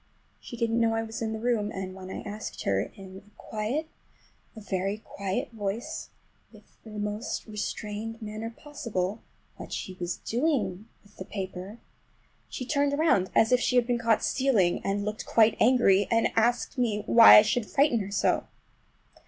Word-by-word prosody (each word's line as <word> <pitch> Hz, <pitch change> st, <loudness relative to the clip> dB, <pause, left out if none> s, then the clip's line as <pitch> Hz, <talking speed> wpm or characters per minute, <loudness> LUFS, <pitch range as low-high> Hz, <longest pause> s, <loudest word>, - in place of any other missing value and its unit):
She 240 Hz, -, -9 dB
didn't 230 Hz, 0 st, 0 dB
know 225 Hz, -1 st, +2 dB
I 225 Hz, -, 0 dB
was 225 Hz, 0 st, -7 dB
in 220 Hz, -1 st, -1 dB
the 220 Hz, -, -4 dB
room, 220 Hz, -3 st, 0 dB
and 190 Hz, -1 st, -5 dB
when 185 Hz, 0 st, -10 dB
I -, -, -5 dB
asked 210 Hz, +1 st, -6 dB
her 95 Hz, 0 st, +1 dB
in 190 Hz, -1 st, -11 dB
a 205 Hz, -, -22 dB
quiet, 225 Hz, +9 st, -3 dB, 0.7 s
a -, -, -8 dB
very 195 Hz, -1 st, -2 dB
quiet 200 Hz, -2 st, -4 dB
voice, 225 Hz, +7 st, -4 dB, 0.4 s
with -, -, -16 dB, 0.2 s
the 220 Hz, -, -12 dB
most 210 Hz, +1 st, -3 dB
restrained 215 Hz, +1 st, -5 dB
manner 215 Hz, 0 st, -5 dB
possible, 225 Hz, -7 st, -4 dB, 0.4 s
what -, -, -9 dB
she 185 Hz, -, -5 dB
was 175 Hz, 0 st, -3 dB
doing 225 Hz, -, -1 dB, 0.2 s
with 205 Hz, 0 st, -23 dB
the 185 Hz, -, -7 dB
paper 190 Hz, +1 st, -6 dB, 0.7 s
she 255 Hz, -, -5 dB
turned 285 Hz, +1 st, +1 dB
around 285 Hz, -, +2 dB
as 220 Hz, -, +4 dB
if 250 Hz, -, +5 dB
she 250 Hz, -, 0 dB
had 245 Hz, -1 st, +4 dB
been 240 Hz, -1 st, 0 dB
caught 230 Hz, -2 st, +2 dB
stealing, 230 Hz, -10 st, +2 dB
and 200 Hz, +1 st, -1 dB
looked 210 Hz, +1 st, -4 dB
quite 225 Hz, -1 st, +4 dB
angry—asked 230 Hz, +2 st, +3 dB
me 215 Hz, -4 st, 0 dB
why 230 Hz, -1 st, +9 dB
I 210 Hz, -, +9 dB
should 215 Hz, +1 st, -1 dB
frighten 280 Hz, -4 st, +3 dB
her 195 Hz, -1 st, -4 dB
so! 200 Hz, -, +1 dB
220 Hz, 170 wpm, -27 LUFS, 200-235 Hz, 0.7 s, why